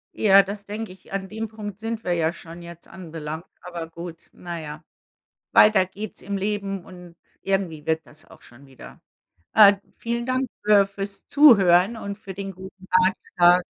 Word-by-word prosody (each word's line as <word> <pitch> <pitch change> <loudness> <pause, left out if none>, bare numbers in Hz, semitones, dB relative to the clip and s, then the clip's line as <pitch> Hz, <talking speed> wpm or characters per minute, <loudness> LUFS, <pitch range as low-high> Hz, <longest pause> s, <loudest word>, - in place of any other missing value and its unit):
Ja, 200 -2 +6
das 200 +1 -7
denke 210 0 -6
ich. 185 +1 -15
An 190 -1 -3
dem 220 +1 -4
Punkt 210 -2 -8
sind 225 0 -4
wir 180 - 0
ja 165 -1 0
schon 170 0 -11
jetzt 170 0 -12
anbelangt, 160 -2 -7 0.2
aber 170 -2 -7
gut, 170 0 -9
na 175 -1 -7
ja. 155 0 -8 0.7
Weiter 210 -3 +6
geht's 195 +3 -8
im 200 +1 -3
Leben 195 -2 -3
und 180 -2 -13 0.3
irgendwie 185 -6 -2
wird 160 0 -1
das 155 +1 -13
auch - - -18
schon 125 +4 -17
wieder. 135 -1 -14 0.5
Äh, 205 -2 +8 0.2
vielen 235 +1 -3
Dank 255 +1 0 0.2
für 205 -1 +5
fürs 200 0 -7
Zuhören 205 - +6
und 200 -2 -6
für 195 -2 -9
den 195 +1 -6
guten 190 +1 -12
Ratschlag. 180 -1 +3
190 Hz, 170 wpm, -23 LUFS, 170-205 Hz, 0.7 s, Äh